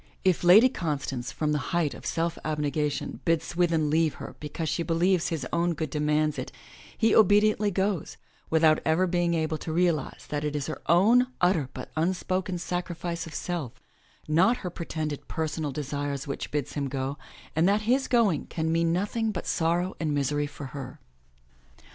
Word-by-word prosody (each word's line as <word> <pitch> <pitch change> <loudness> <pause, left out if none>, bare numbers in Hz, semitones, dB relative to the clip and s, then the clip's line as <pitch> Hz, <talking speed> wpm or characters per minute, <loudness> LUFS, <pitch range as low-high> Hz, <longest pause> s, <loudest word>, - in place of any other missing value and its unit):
If 185 -2 +3
Lady 195 +8 +8
Constance, 145 - -3
from 150 -1 -1
the 150 - +1 0.2
height 155 -6 +1
of - - -8
self 165 0 -1
abnegation, 150 -1 -2
bids 165 -1 +1
Swithin 165 -4 +1
leave 160 -1 +2
her - - -8
because 150 +2 -4
she 160 +3 -1
believes 175 +1 +2
his 160 -6 -3
own 170 0 +1
good 155 -2 -3
demands 150 0 +1
it, - - -5 0.5
he 225 -1 +3
obediently 210 0 +5
goes, 195 -2 -1 0.3
without 160 -1 +4
ever 160 +4 +2
being 175 -1 +1
able 160 -1 -1
to 160 - -5
realize 165 -3 0
that 150 0 -2
it 150 0 -2
is 145 -2 -2
her 155 - -5
own 225 +9 +5
utter 175 -7 +2
but 130 - -7
unspoken 185 +2 -1
sacrifice 175 -1 -4
of 150 - -9
self, 165 -9 -3 0.5
not 185 +10 +4
her 180 - -2
pretended 155 -3 -4
personal 160 -2 -2
desires 145 0 -3
which 140 - -4
bids 145 -3 -3
him 140 -2 -2
go, 135 +1 -3 0.4
and 165 +4 +4
that 205 +2 +2
his 255 +5 +1
going 220 - +2
can 160 -1 -2
mean 165 0 +2
nothing 210 +5 0
but 185 - -5
sorrow 175 +3 0
and 155 -3 0
misery 145 +1 0
for 145 0 -9
her. 135 -3 -7
165 Hz, 170 wpm, -27 LUFS, 150-180 Hz, 0.5 s, Lady